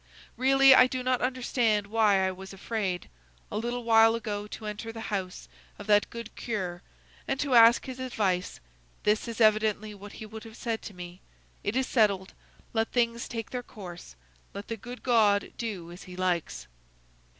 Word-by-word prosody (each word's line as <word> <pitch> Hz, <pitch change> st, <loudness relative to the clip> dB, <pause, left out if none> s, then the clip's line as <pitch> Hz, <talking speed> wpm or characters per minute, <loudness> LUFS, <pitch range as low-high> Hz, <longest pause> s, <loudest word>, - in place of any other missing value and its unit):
Really, 270 Hz, +2 st, +6 dB
I 255 Hz, -1 st, +7 dB
do 255 Hz, 0 st, -4 dB
not 255 Hz, -1 st, +1 dB
understand 240 Hz, -4 st, +1 dB
why 205 Hz, -2 st, +3 dB
I -, -, -1 dB
was 190 Hz, +1 st, -10 dB
afraid, 195 Hz, -2 st, -3 dB, 0.4 s
a -, -, -2 dB
little 240 Hz, +2 st, -3 dB
while 225 Hz, 0 st, +6 dB
ago, 210 Hz, -2 st, -4 dB
to 215 Hz, -, -8 dB
enter 210 Hz, +2 st, -5 dB
the 225 Hz, -1 st, -6 dB
house 185 Hz, -2 st, -4 dB, 0.3 s
of 205 Hz, -, -9 dB
that 205 Hz, -1 st, +3 dB
good 235 Hz, -1 st, -8 dB
curé, 185 Hz, -6 st, -4 dB, 0.5 s
and 270 Hz, -, -1 dB
to 280 Hz, -3 st, 0 dB
ask 230 Hz, 0 st, +7 dB
his 260 Hz, -1 st, -7 dB
advice; 200 Hz, -8 st, -1 dB, 0.4 s
this 210 Hz, +3 st, +1 dB
is 230 Hz, 0 st, -6 dB
evidently 215 Hz, -1 st, +3 dB
what 205 Hz, +1 st, -11 dB
he 220 Hz, -, -8 dB
would 220 Hz, 0 st, -9 dB
have 225 Hz, 0 st, -12 dB
said 230 Hz, -3 st, -3 dB
to 205 Hz, -, -9 dB
me: 180 Hz, +1 st, -9 dB, 0.4 s
It 205 Hz, -, -2 dB
is 265 Hz, 0 st, +2 dB
settled; 200 Hz, -7 st, +1 dB, 0.4 s
let 225 Hz, -1 st, 0 dB
things 235 Hz, -1 st, 0 dB
take 225 Hz, -2 st, -6 dB
their 250 Hz, -, -3 dB
course; 175 Hz, -, -11 dB, 0.4 s
let 200 Hz, +1 st, -7 dB
the 230 Hz, -, -2 dB
good 245 Hz, +4 st, -10 dB
God 215 Hz, -5 st, +3 dB
do 195 Hz, -8 st, -5 dB
as 175 Hz, -, -11 dB
he 180 Hz, -1 st, -10 dB
likes!" 180 Hz, -2 st, -1 dB
220 Hz, 180 wpm, -28 LUFS, 200-235 Hz, 0.5 s, I